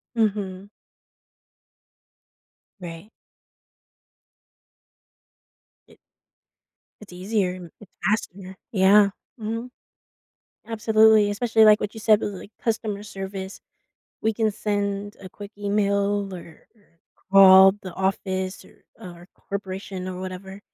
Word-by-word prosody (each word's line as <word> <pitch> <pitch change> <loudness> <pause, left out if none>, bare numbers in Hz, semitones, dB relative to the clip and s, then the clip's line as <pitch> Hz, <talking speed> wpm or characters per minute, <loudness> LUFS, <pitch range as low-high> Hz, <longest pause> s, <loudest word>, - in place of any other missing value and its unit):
Mhm. 200 -3 -2 2.1
Right. 170 +3 -9 2.8
It - - -20 1.0
It's 205 -3 -13
easier 185 0 -1
and 180 -3 -11
it's 210 - -15
faster. 190 -3 -2 0.2
Yeah. 200 +1 +5 0.3
Mhm. 230 +3 -5 1.0
Absolutely, 220 -1 +4
especially, 220 +1 +3
like, 210 0 +6
what 210 - -3
you - - -7
said 215 0 +3
with, 205 - -3
like, 200 - -11
customer 215 -3 -2
service. 195 -1 -7 0.6
We 220 0 +1
can 220 0 0
send 205 -1 -3
a 190 - -10
quick 205 +3 -11
email 200 -1 0
or 170 -2 -13
or 205 -6 -31 0.3
call 190 0 +8
the 185 - -8
office, 190 0 -2
er, - - -22
or 175 0 -12
corporation 190 -1 -6
or 185 0 -6
whatever 190 +1 -8
200 Hz, 105 wpm, -23 LUFS, 190-210 Hz, 2.8 s, call